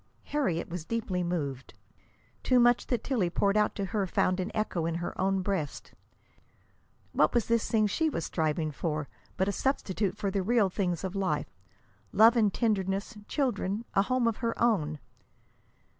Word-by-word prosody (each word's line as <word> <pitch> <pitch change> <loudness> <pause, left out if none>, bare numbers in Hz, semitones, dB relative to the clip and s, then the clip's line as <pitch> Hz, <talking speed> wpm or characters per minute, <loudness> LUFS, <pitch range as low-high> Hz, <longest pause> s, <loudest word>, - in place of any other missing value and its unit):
Harriet 190 - -1
was 170 -1 -5
deeply 200 -2 -2
moved. 145 -7 -3 0.7
Too 255 -1 +3
much 240 0 +4
that 245 - -1
Tillie 225 -10 0
poured 200 +3 +1
out 210 0 +2
to 200 - -2
her 200 -3 +1
found 185 +1 +1
an 185 +2 -2
echo 185 -6 -1
in 165 - -2
her 175 +1 -4
own 190 0 +1
breast. 185 -7 -3 1.2
What - - +2
was 235 - +3
this 230 -1 +1
thing 215 -2 +3
she 315 +10 +1
was 165 - -3
striving 155 -1 -1
for 150 0 -3 0.3
but 190 - +1
a - - +2
substitute 205 -4 -1
for 200 -2 -1
the 195 0 0
real 210 -1 +2
things 180 -3 -1
of 190 0 -4
life 195 -1 -1 0.6
love 225 +3 +6
and 215 -4 +3
tenderness, 200 -1 -1
children, 235 -6 -1
a 195 - +4
home 255 +2 +1
of 230 - 0
her 230 -1 -2
own? 160 -11 +2
195 Hz, 170 wpm, -29 LUFS, 175-230 Hz, 1.2 s, love